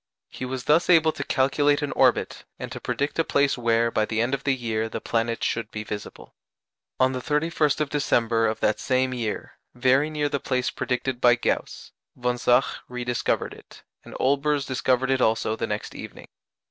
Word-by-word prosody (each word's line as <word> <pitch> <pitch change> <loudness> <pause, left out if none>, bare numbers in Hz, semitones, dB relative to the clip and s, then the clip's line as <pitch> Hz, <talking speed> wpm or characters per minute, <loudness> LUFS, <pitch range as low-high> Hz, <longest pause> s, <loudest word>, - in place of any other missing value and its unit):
He 130 - -6
was 130 0 -4
thus 160 +6 +3
able 160 -2 +6
to - - -5
calculate 145 +2 +2
an 145 - -2
orbit, - - +2
and - - -7
to - - -6
predict 145 +3 -2
a - - +4
place 140 -2 +2
where, 115 -1 +1
by 110 - +1
the 110 0 -2
end 120 +4 +1
of 135 0 -2
the 135 -2 +2
year, 110 -3 -2
the - - -4
planet 115 0 -1
should 115 - -1
be 105 - -5
visible. 105 -1 -8 0.7
On 130 0 +4
the 130 -1 -4
31st 150 0 +1
of 150 - -1
December 115 -5 +2
of 110 - -2
that 105 - +1
same 130 0 +1
year, 115 -4 -4 0.2
very 130 +4 +3
near 150 -1 -1
the 140 -1 -2
place 125 -2 -1
predicted 125 0 -2
by 120 -1 +6
Gauss, - - -3 0.2
von 125 0 -1
Zach 125 +3 +4 0.2
rediscovered 125 -1 -2
it, - - -16 0.2
and - - -11
Olbers 140 +1 +1
discovered 130 0 +1
it 130 -1 +1
also 110 -1 +1
the - - -3
next 105 0 -4
evening. - - -10
130 Hz, 190 wpm, -25 LUFS, 115-140 Hz, 0.7 s, able